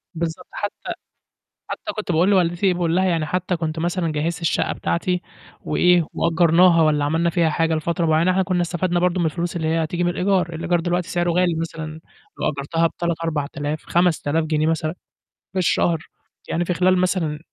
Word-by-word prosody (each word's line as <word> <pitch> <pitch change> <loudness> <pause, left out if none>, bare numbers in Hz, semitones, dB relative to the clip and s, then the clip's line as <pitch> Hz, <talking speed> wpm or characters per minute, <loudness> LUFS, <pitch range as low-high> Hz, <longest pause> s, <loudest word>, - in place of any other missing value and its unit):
بالضبط، 165 0 -4
حتى 205 -1 -5 0.8
حتى 315 - -4
كنت 210 -4 -2
باقول 170 +4 +3
لوالدتي 180 0 +2
باقول 175 -1 0
لها: 190 - +3
"يعني 165 -4 +1
حتى 180 +2 -1
كنت 160 -1 -3
مثلًا 170 0 -1
جهّزت 160 +3 -2
الشَقّة 165 - 0
بتاعتي 180 +1 -1 0.4
وإيه، 180 -2 +3
وأجّرناها 170 +1 +4
والّا 150 -2 +2
عملنا 165 +3 +1
فيها 170 -2 +2
حاجة 165 +1 +1
لفترة 165 +2 -1
معيّنة 160 +3 +3
إحنا 190 +1 +2
كنّا 185 -1 0
استفدنا 175 0 -1
برضه 180 +1 +1
من 170 - +2
الفلوس 170 +2 -2
اللي 160 -2 -1
هي 165 0 +1
هتيجي 175 +2 -2
من 175 - +2
الإيجار." 180 -1 0
الإيجار 170 +2 0
دلوقتي 175 +1 -1
سعره 175 -3 0
غالي، 175 0 +2
مثلًا 160 -1 -5 0.4
لو - - +1
أجّرتها 150 +4 0
ب3، 170 0 -2
4000، 150 -1 -3
5000 165 -3 +1
جنيه 155 -1 0
مثلًا 160 0 0 0.6
في 190 - 0
الشهر، 165 -2 +1 0.4
يعني 175 +1 0
في 180 - 0
خلال 185 +2 +3
مثلًا 180 -5 0
170 Hz, 180 wpm, -22 LUFS, 160-180 Hz, 0.8 s, وأجّرناها